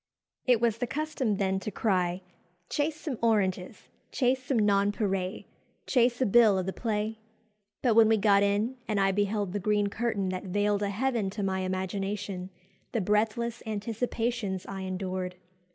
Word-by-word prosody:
"It 245 -3 +5
was 230 -1 +1
the 245 - -1
custom 265 -7 -1
then 190 -1 0
to 205 - -4
cry, 185 -3 0 0.5
''Chase 300 +2 +1
some 295 -6 -5
oranges, 195 -5 0 0.2
'chase 255 0 +1
some 255 0 0
nonpareils, 200 -2 +1 0.4
'chase 245 -2 +2
a 260 - +3
bill 220 -2 +5
of 185 - -1
the 190 - -3
play?' 220 -1 -2 0.6
But 245 -4 +4
when 220 0 +6
we 225 - +4
got 200 -1 +4
in, 205 +5 +1
and 210 -2 0
I 195 0 +3
beheld 205 -1 0
the 205 - -1
green 205 +1 +1
curtain 210 -3 -1
that 185 0 -4
veiled 205 +2 +1
a 200 - 0
heaven 225 -1 0
to 205 +1 -4
my 190 -1 0
imagination, 190 +1 -3 0.4
the 230 - +1
breathless 220 +3 0
anticipations 220 -2 -2
I 195 - -6
endured! 185 -1 -3
205 Hz, 160 wpm, -29 LUFS, 190-230 Hz, 0.6 s, when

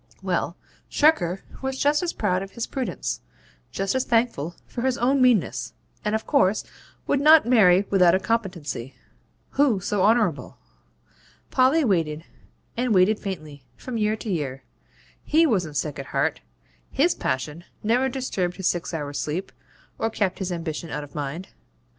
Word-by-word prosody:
Well, - - -1 0.3
Shirker 195 - +2 0.2
was 265 0 -3
just 290 +2 +2
as 350 -2 -1
proud 185 -3 0
of 195 0 -8
his 235 - -3
prudence 260 -3 -3 0.5
just 195 0 -1
as 260 -1 +1
thankful 225 - 0
for 240 - -6
his 260 0 +1
own 265 +3 +2
meanness, 245 -7 +2 0.3
and 210 +1 0
of 220 - -3
course 215 -8 +2 0.4
would 280 - +1
not 310 -1 +7
marry 200 -6 +5
without 180 -3 +5
a - - +2
competency. 185 - -3 0.6
Who 270 -8 +3
so 200 +1 -1
honourable? 210 -7 +2 0.9
Polly 270 +4 +4
waited, 165 -6 0 0.5
and 245 -2 +1
waited 190 +4 +4
faintly, 155 -8 -7
from 245 -3 -5
year 215 0 +1
to 220 - -7
year. 135 -6 -3 0.6
HE 320 +2 +4
wasn't 180 - 0
sick 150 -3 -2
at 135 - -6
heart; - - 0 0.5
HIS 330 +6 +2
passion 150 +6 -3 0.2
never 245 +5 +2
disturbed 200 -9 -2
his 190 -2 -1
six 175 -1 -1
hours' 145 -2 -4
sleep, 165 +6 -3 0.5
or 225 - +1
kept 205 -4 -1
his 190 -2 -3
ambition 165 -1 -4
out 150 0 -4
of 145 - -12
mind. 150 +5 -5
195 Hz, 155 wpm, -24 LUFS, 170-245 Hz, 0.9 s, not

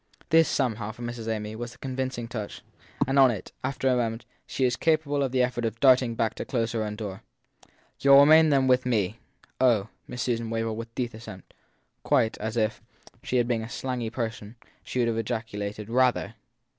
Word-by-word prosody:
This, 165 0 +5
somehow, 115 -5 -1
for 120 +2 -10
Miss 120 -1 -5
Amy, 110 -1 -3
was 120 +1 -6
the - - -18
convincing 130 -2 -4
touch; 110 -3 -6 0.4
and 135 +1 +2
on 135 -1 +8
it, 110 -5 -5
after 135 -1 -1
a 130 - +4
moment, 115 -1 -2 0.2
she 130 - 0
was 125 -1 +1
capable 155 -3 +1
of 135 -2 0
the 130 -1 +2
effort 125 -1 -2
of 115 0 -2
darting 130 -3 +4
back 115 -1 0
to - - -5
close 115 -3 -1
her 115 -2 -1
own 105 0 -4
door. 105 -3 -6 0.8
You 140 0 +5
ll 140 - +10
remain 155 +2 +7
then 135 -2 +3
with 130 0 +3
me. 110 -3 0 0.4
Oh! 115 -5 +3 0.2
Miss 125 - -4
Susan 115 -2 -1
wailed 115 -1 -2
with 115 +1 -8
deep 125 -1 -2
assent; 110 -5 -11 0.5
quite, 110 - +2
as 110 +2 -4
if, 110 -1 0 0.3
had - - -30
she 125 -1 +1
been 120 -1 -1
a 110 - -7
slangy 125 -3 -3
person, 115 -2 -5 0.3
she - - -6
would 120 -2 +2
have 115 -1 0
ejaculated 105 -2 -4
Rather! 125 -1 +1
120 Hz, 200 wpm, -26 LUFS, 110-130 Hz, 0.8 s, ll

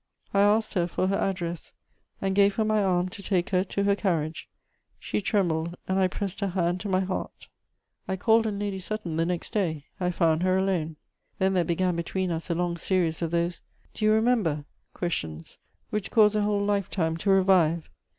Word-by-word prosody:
I 200 - +4
asked 215 +2 +3
her 175 -3 +1
for 185 +2 -1
her 195 - +1
address, 175 -4 -3 0.5
and 195 0 -1
gave 200 0 +4
her 220 - +1
my 215 -1 +2
arm 180 -1 +1
to 200 +2 -9
take 190 -2 0
her 185 -1 +3
to 200 +1 -2
her 200 0 +3
carriage. 165 -6 -2 0.5
She - - -3
trembled, 170 -5 0
and 190 +1 +1
I 190 - +4
pressed 195 +1 -4
her 200 - 0
hand 175 -1 0
to 205 - -5
my 185 0 +2
heart. 190 0 -5 0.6
I 190 - -1
called 225 +4 +3
on 205 -2 -2
Lady 200 -1 -3
Sutton 185 -4 -3
the 165 0 +1
next 175 -1 -3
day; 160 -8 -1
I 180 -1 0
found 165 -2 +2
her 185 0 +2
alone. 180 -5 0 0.4
Then 190 0 +2
there 180 -2 +3
began 175 +2 0
between 180 +2 -2
us 165 +2 -4
a 170 - +1
long 175 0 -1
series 170 -3 0
of 165 - 0
those 170 +1 -1 0.3
"Do - - -6
you 215 - +5
remember?" 215 -10 +2 0.3
questions 80 - -4 0.3
which 210 -1 -2
cause 215 -2 +5
a 210 - +1
whole 205 -1 +1
life 200 -2 0
time 165 -4 0
to 195 +4 -2
revive. 185 -4 +4
185 Hz, 200 wpm, -27 LUFS, 170-200 Hz, 0.6 s, you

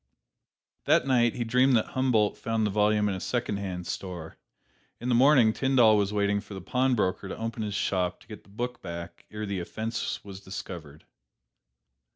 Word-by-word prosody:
That - - +4
night, 120 -3 +3
he 120 - -1
dreamed 125 +3 +3
that 110 - +1
Humboldt 125 -5 +2
found 115 -1 -1
the 105 - 0
volume 105 +1 +2
in 100 - 0
a 95 - -4
secondhand 100 -6 -3
store. 90 -4 -6 0.6
In 120 - -3
the - - +3
morning, 125 -3 +5
Tyndall 125 -5 +4
was 100 -1 +1
waiting 100 0 +1
for 100 -1 -10
the - - -5
pawnbroker 105 -2 0
to - - -6
open 115 0 -4
his 105 -2 -3
shop 90 -3 0
to - - -19
get 105 -2 -9
the - - -23
book 120 +5 -5
back 85 -1 -8
ere 105 0 -5
the 100 -2 -3
offense 110 +6 -4
was 95 -2 -8
discovered. 85 -6 -8
105 Hz, 180 wpm, -28 LUFS, 95-120 Hz, 0.6 s, morning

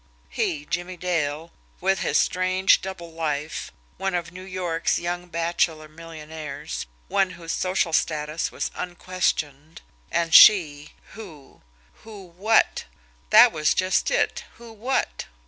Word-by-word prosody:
He, 150 -1 -2
Jimmie 175 +3 -4
Dale, 165 -3 -2 0.3
with 190 +1 +1
his - - +1
strange 185 +1 +2
double 185 -3 -7
life, 155 -1 -4 0.3
one 195 -1 -2
of 170 -1 -3
New 180 +1 -10
York's 185 -3 -2
young 175 +1 -4
bachelor 165 -2 -1
millionaires, 155 - -8 0.2
one 195 -2 +1
whose 165 -1 -6
social 185 -2 -1
status 155 0 -1
was - - -4
unquestioned; 170 -4 -3 0.3
and 165 -1 -1
she, 155 -7 +7 0.2
who 165 -11 -13 0.4
who 205 -5 -12
WHAT? 215 +5 +2 0.4
That - - +8
was 155 -2 +1
just 185 0 +1
it! - - 0
Who 235 -1 -13
what? 245 +5 -2
170 Hz, 125 wpm, -24 LUFS, 155-185 Hz, 0.4 s, That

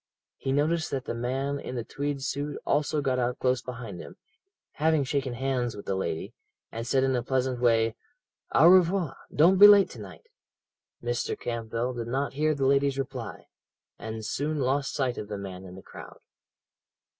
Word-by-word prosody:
He 135 - -3
noticed 155 +4 +1
that 130 -2 -3
the - - -3
man 135 +4 -2
in 130 - -6
the 120 - -3
tweed 140 +2 -4
suit 145 +1 -3
also 150 +1 +1
got 130 -2 0
out 125 0 -1
close 125 -1 +1
behind 115 -7 -7
him, - - -10 0.6
having 155 -1 +2
shaken 135 -2 -2
hands 125 -2 -1
with 100 - -9
the - - -1
lady, 95 -4 -3 0.4
and 115 +1 -5
said 130 +2 +2
in 135 -1 +2
a 125 - 0
pleasant 130 0 -1
way: 115 -2 +3 0.6
'Au 150 +5 +6
revoir! 180 -4 +4 0.2
Don't 180 +5 +4
be 205 - +12
late 205 -2 +7
to 120 - -10
night.' 95 -6 -11 0.8
Mr. 120 0 -2
Campbell 115 +1 -3
did 120 -2 -5
not 135 +4 -2
hear 155 +2 +1
the 135 -1 0
lady's 140 0 +2
reply, 135 -1 -5 0.5
and 110 0 -6
soon 150 +7 -2
lost 135 +1 0
sight 130 -4 -1
of 105 - -6
the 105 -1 -5
man 95 -1 -8
in 90 0 -10
the 95 - -12
crowd. - - -11
130 Hz, 180 wpm, -27 LUFS, 115-145 Hz, 0.8 s, be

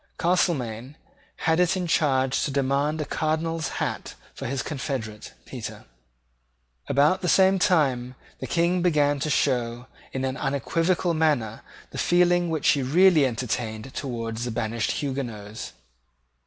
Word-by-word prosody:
Castelmaine 140 - 0 0.5
had 160 0 +3
it 180 +1 +3
in 180 - -2
charge 135 -5 +2
to - - -1
demand 140 +3 0
a 150 - -1
Cardinal's 160 0 -1
hat - - -3 0.2
for - - -6
his 130 -1 -2
confederate 130 -7 -5
Petre. - - -7 1.0
About 150 +7 +3
the 180 - 0
same 190 0 +5
time 130 -9 +2 0.2
the 130 - -5
King 170 +6 +1
began 145 -4 +2
to 155 - -2
show, 120 -4 0 0.3
in 130 0 -2
an 130 +1 -2
unequivocal 165 +5 0
manner, 145 -9 0 0.3
the - - -6
feeling 175 0 +3
which 160 -2 +1
he 140 - +3
really 155 +2 +5
entertained 115 0 -4
towards 115 -3 -4
the 120 - -2
banished 110 0 -2
Huguenots. 115 -7 -5
140 Hz, 135 wpm, -25 LUFS, 125-165 Hz, 1.0 s, same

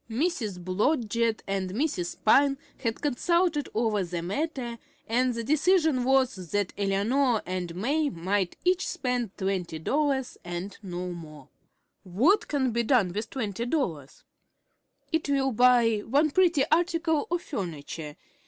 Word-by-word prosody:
Mrs. 230 - -1
Blodgett 225 - 0
and 195 -1 -2
Mrs. 220 - -2
Pyne 275 +5 +5 0.2
had 230 -4 -3
consulted 310 +2 +1
over 215 -3 +1
the 175 -1 -4
matter, 240 - -3 0.3
and 245 +2 +1
the 230 - -3
decision 310 0 +3
was 265 -2 +2
that 205 +1 -1
Eleanor 215 +5 +1
and 180 -2 -4
May 285 - +1
might 185 +1 -1
each 365 0 +2
spend 250 - -2
twenty 190 -4 -2
dollars, 270 - -1
and 175 +3 -5
no 180 -2 -5
more. 155 -3 -10 0.5
What 265 - +2
can 265 -4 0
be 235 +1 +1
done 225 -7 +2
with 215 +3 -3
twenty 230 -3 -3
dollars? 165 - -3 0.9
It 320 -3 -1
will 270 -1 +2
buy 240 -1 +4
one 285 +8 +1
pretty 345 -5 +4
article 330 -2 +1
of 345 0 -1
furniture. 160 - -5
235 Hz, 135 wpm, -27 LUFS, 190-285 Hz, 0.9 s, Pyne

